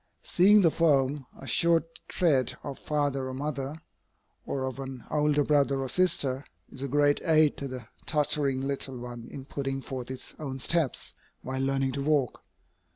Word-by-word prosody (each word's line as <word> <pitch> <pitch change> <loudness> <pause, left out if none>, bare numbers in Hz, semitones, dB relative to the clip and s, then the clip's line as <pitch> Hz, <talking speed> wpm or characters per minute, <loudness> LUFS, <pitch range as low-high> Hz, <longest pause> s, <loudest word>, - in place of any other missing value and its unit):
Seeing 205 +4 +5
the 165 -4 +4
firm, 140 -4 +2
assured 165 +5 +2 0.2
tread 140 -9 +1
of 140 -2 -6
father 145 -3 -1
or 130 - -5
mother, 145 +2 -4 0.6
or 135 -1 -2
of 130 0 -5
an 130 -3 -7
older 150 -1 +2
brother 140 -2 +2
or 135 -1 -2
sister, 140 -6 +3 0.3
is 130 - -10
a 140 - -2
great 145 +1 +3
aid 155 -2 +4
to 140 - -4
the 130 -4 -7 0.2
tottering 145 -3 +1
little 135 -2 -2
one 120 -1 -8
in 135 - -8
putting 135 -1 -3
forth 130 -2 -6
its 130 0 -6
own 135 -4 -4
steps 155 +1 0 0.3
while 130 +1 -3
learning 135 0 +1
to 140 - -3
walk. 140 -4 +1
140 Hz, 160 wpm, -28 LUFS, 130-150 Hz, 0.6 s, Seeing